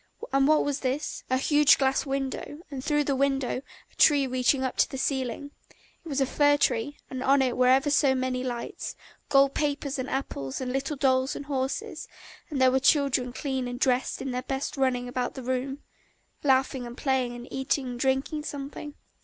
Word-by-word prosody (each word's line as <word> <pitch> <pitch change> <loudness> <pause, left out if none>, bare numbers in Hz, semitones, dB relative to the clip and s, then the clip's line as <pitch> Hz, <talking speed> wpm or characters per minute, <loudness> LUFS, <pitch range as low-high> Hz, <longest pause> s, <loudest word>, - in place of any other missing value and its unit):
And 275 0 +4
what 310 0 +4
was 285 -1 -1
this? 270 +3 -3
A 260 - +2
huge 290 +2 +5
glass 270 +1 +1
window, 275 +3 -3
and 265 -2 -5
through 295 0 +2
the 280 -1 0
window 270 -1 0 0.3
a - - -26
tree 285 -3 +6
reaching 255 +1 +1
up 260 - -2
to - - +3
the 270 - -6
ceiling; 265 +1 -2 0.5
it 330 - -9
was 280 -1 -1
a 270 - +3
fir 290 +2 +3
tree, 270 +1 0
and 260 -1 -4
on 275 +1 +4
it 255 -2 0
were 250 0 +3
ever 270 +3 +4
so 280 -2 +4
many 255 0 -1
lights, 240 -2 -5 0.3
gold 275 0 +5
papers 285 -1 -1
and 260 - -3
apples 140 - -3
and 255 -1 -3
little 275 +3 -2
dolls 260 -1 +1
and 285 - -6
horses; 265 -2 -3 0.4
and 290 -4 -3
there 260 0 +5
were 265 - +3
children 270 -3 +2
clean 265 -1 -3
and 245 0 -5
dressed 255 0 +1
in 270 - -3
their 250 0 -2
best 270 +2 -3
running 255 -2 0
about 245 0 -3
the 260 - -7
room, 260 +3 -3 0.6
laughing 265 -2 +1
and 240 +1 -10
playing 260 -3 0
and 240 +1 -9
eating 265 +1 -1
and 245 -1 -6
drinking 270 +4 0
something. 290 0 -7
265 Hz, 195 wpm, -27 LUFS, 255-280 Hz, 0.6 s, tree